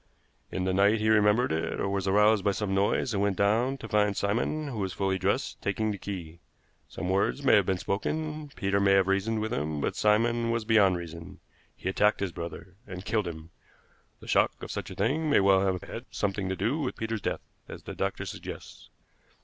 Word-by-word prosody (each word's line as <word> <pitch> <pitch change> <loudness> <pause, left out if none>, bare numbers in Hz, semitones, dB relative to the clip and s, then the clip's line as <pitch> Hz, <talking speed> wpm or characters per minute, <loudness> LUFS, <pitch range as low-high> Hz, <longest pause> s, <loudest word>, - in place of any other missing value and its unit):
In 95 - -2
the 95 0 0
night 100 +3 +4
he 110 0 +1
remembered 105 +3 +4
it, 80 +1 -2
or - - 0
was 100 -1 -1
aroused 105 +1 +4
by 100 - +3
some 95 -1 -2
noise, 100 +5 +1
and 100 - 0
went 100 -2 +1
down 115 +7 +2
to - - -8
find 105 -2 +1
Simon, 125 +9 -1
who 115 -5 -5
was 95 -2 -2
fully 95 -1 -1
dressed, 100 +8 -1
taking 105 +2 -1
the 100 - -5
key. 85 -5 -7 0.5
Some - - -5
words 100 +9 0
may 135 - +5
have 100 -4 +5
been 95 -1 +1
spoken; 155 - -3
Peter 100 0 0
may 100 0 +4
have 95 -1 +5
reasoned 100 +3 0
with 110 +2 -2
him, 75 -8 -2
but - - -1
Simon 115 +2 +2
was 115 -1 -1
beyond 100 -5 +4
reason. 85 +2 -9 0.4
He - - -7
attacked 105 +3 +2
his 100 -2 -2
brother, 85 +2 -7
and 90 0 -8
killed 105 -5 0
him. 80 0 -8 0.7
The - - -12
shock - - +2
of - - -6
such - - -5
a - - -8
thing 150 +10 0
may 145 - +5
well 95 -1 +4
have 95 -2 -1
had - - -7
something 100 -1 -2
to 95 - -1
do 115 +11 -1
with 140 -5 -3
Peter's 110 -1 -3
death, - - -2 0.3
as - - -9
the - - -7
doctor - - -2
suggests. - - -9
100 Hz, 215 wpm, -28 LUFS, 95-110 Hz, 0.7 s, may